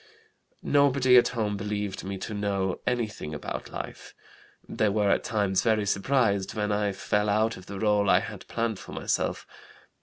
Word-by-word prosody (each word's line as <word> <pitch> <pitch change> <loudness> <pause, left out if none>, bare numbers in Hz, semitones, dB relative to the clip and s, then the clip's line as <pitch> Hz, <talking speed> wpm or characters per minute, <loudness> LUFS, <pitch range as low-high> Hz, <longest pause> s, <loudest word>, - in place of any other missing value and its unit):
Nobody 140 -3 +4
at 120 -1 +7
home 105 -4 -2
believed 105 -1 -3
me 95 0 -4
to 110 - -6
know 100 -2 -1
anything 110 -10 -2
about 75 - -5
life. - - -8 0.5
They 110 - +1
were 100 -1 +2
at - - +2
times 100 -5 +1
very 110 -3 +2
surprised 100 -1 +1
when 105 -1 -1
I 105 0 +1
fell 105 +2 0
out 110 +2 +2
of 90 - -13
the 100 - -6
rôle 105 -1 +2
I 90 - +5
had 105 -4 -8
planned 115 -3 -2
for - - -10
myself. - - -1
105 Hz, 170 wpm, -27 LUFS, 100-110 Hz, 0.5 s, at